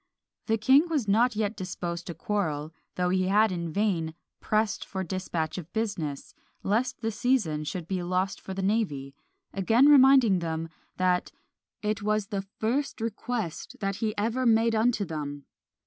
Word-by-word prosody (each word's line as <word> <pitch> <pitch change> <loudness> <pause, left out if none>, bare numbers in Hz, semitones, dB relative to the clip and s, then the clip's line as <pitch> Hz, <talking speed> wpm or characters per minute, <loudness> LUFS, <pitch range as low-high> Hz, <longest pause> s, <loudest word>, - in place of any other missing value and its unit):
The 225 -1 +2
king 270 +9 +5
was 290 -9 0
not 225 +4 +3
yet 215 0 -1
disposed 175 -2 -5
to 170 - -5
quarrel, 160 -5 -2 0.2
though 180 0 +1
he 185 0 +1
had 210 +2 +4
in 170 -2 -3
vain 170 -5 0 0.2
pressed 215 -1 0
for 190 -1 -4
dispatch 180 -3 -3
of 170 -1 -10
business, 195 -11 -3 0.3
lest 225 +6 0
the 225 -1 -1
season 215 -11 0
should 170 +1 -4
be 185 -1 -2
lost 185 +2 -1
for 190 - -7
the 195 - -3
navy; 180 -10 -1 0.4
again 225 +7 +4
reminding 265 -8 +7
them, 165 -1 -3 0.3
that 180 -1 +1 0.5
"it 210 0 -1
was 210 0 0
the 200 -3 -2
first 225 +9 -2
request 225 -4 -4
that 195 -1 -2
he 215 -2 -2
ever 230 +5 0
made 225 0 +4
unto 220 -1 +2
them!" 145 -4 -5
200 Hz, 160 wpm, -27 LUFS, 175-225 Hz, 0.5 s, reminding